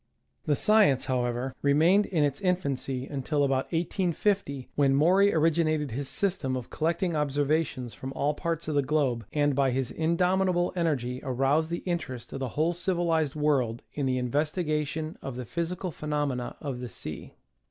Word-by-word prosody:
The 150 - +2
science, 205 - +4
however, 125 0 -1
remained 165 +8 +4
in 165 -6 +1
its 145 -1 -1
infancy 140 -8 -1
un 140 -2 -4
til 145 +2 0
about 135 -1 +1
1850, 175 -4 -1
when 135 -2 +3
Maury 185 +7 +5
originated 155 -3 +1
his 135 +4 -3
system 175 -10 0
of 125 - -8
collecting 170 +2 0
observations 145 -3 0
from 130 - -7
all 145 +2 0
parts 165 0 -3
of 155 - -1
the 145 - +3
globe, 130 -6 0
and 145 -1 +2
by 135 -1 +3
his 130 0 -1
indomitable 180 +2 +1
energy 135 -8 -1
aroused 135 +4 +1
the 170 - -3
interest 165 -9 -4
of - - -4
the 130 -2 -2
whole 160 +3 +2
civilized 170 -5 0
world 135 -6 +1
in 140 -2 -1
the 130 0 +1
investigation 150 +3 -1
of 135 - -6
the 125 0 -5
physical 170 - -3
phenomena 145 -5 -2
of 135 -5 -4
the 125 -1 -6
sea. 75 -8 -7
150 Hz, 165 wpm, -28 LUFS, 135-170 Hz, -, Maury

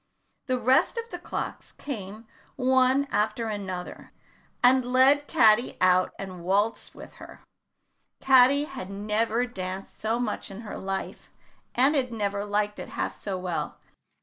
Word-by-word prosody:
The 255 -1 +1
rest 260 - +3
of 460 0 -3
the 355 - -5
clocks - - -6
came 215 -4 -7 0.3
one 260 +1 +3
after 220 +3 0
another 190 -4 -6 0.5
and 255 +1 +5
led 260 +4 +4
Caddy 225 -6 +4
out 185 0 +3
and 185 -3 -8
waltzed 200 +5 0
with - - -12
her. - - -13 0.8
Caddy 265 +2 +5
had 265 -10 -7
never 215 +4 0
danced 190 -4 -6
so 220 +2 0
much 245 -4 -3
in 200 +4 -9
all 210 - -9
her - - -6
life, 195 0 -5 0.5
and 265 +4 +4
had 255 -3 0
never 205 -2 -2
liked 210 0 -1
it - - -7
half - - -3
so 195 -2 -5
well. 180 -2 -4
220 Hz, 150 wpm, -26 LUFS, 195-255 Hz, 0.8 s, and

